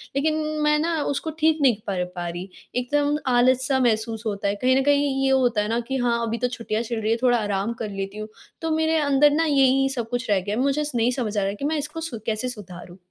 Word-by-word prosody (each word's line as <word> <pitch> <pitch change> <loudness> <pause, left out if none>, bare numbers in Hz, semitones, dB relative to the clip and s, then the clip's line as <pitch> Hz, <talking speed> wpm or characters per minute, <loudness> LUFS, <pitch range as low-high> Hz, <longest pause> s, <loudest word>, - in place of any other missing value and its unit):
लेकिन 310 +3 +1 0.3
मैं 300 0 +3
ना 330 +2 0
उसको 285 +3 -2
ठीक 315 0 +3
नहीं 260 -5 +5
कर 180 -2 -1
पा 175 -1 -4
रही। 175 +3 -6 0.3
एकदम 290 +4 +1 0.2
आलस-सा 260 +2 +3
महसूस 225 -2 0
होता 200 -2 -2
है। 200 - 0
कहीं 260 +1 +4
न - - +1
कहीं 285 -1 +2
ये - - +3
होता 245 -5 +3
है 210 - -2
ना 230 - +1
कि 265 - +1
हाँ 240 -2 +1
अभी 230 - -2
तो 250 +2 0
छुट्टियाँ 230 -3 -3
चल 235 -1 -3
रही 215 +1 0
है, 230 - +2
थोड़ा 245 -1 +4
आराम 205 0 -1
कर 215 - -3
लेती 195 0 -5
हूँ। 215 0 -5 0.3
तो 325 -1 -1
मेरे 320 0 +2
अंदर 290 -1 +4
ना 320 +3 +2
यही 270 -2 +3
सब 235 -3 -3
कुछ 245 -1 -3
रह 200 -2 +3
गया 205 +3 -3
है, 245 - 0
मुझे 280 +2 +1
नहीं 235 +1 +2
समझ 230 -5 -3
आ 200 - +2
रहा 195 +1 -1
कि 275 - -3
मैं 310 +1 0
इसको 295 +3 -5
सु 270 -9 -5
कैसे 220 +3 -1
सुधारूँ? 180 -5 -10
245 Hz, 250 wpm, -23 LUFS, 215-285 Hz, 0.3 s, नहीं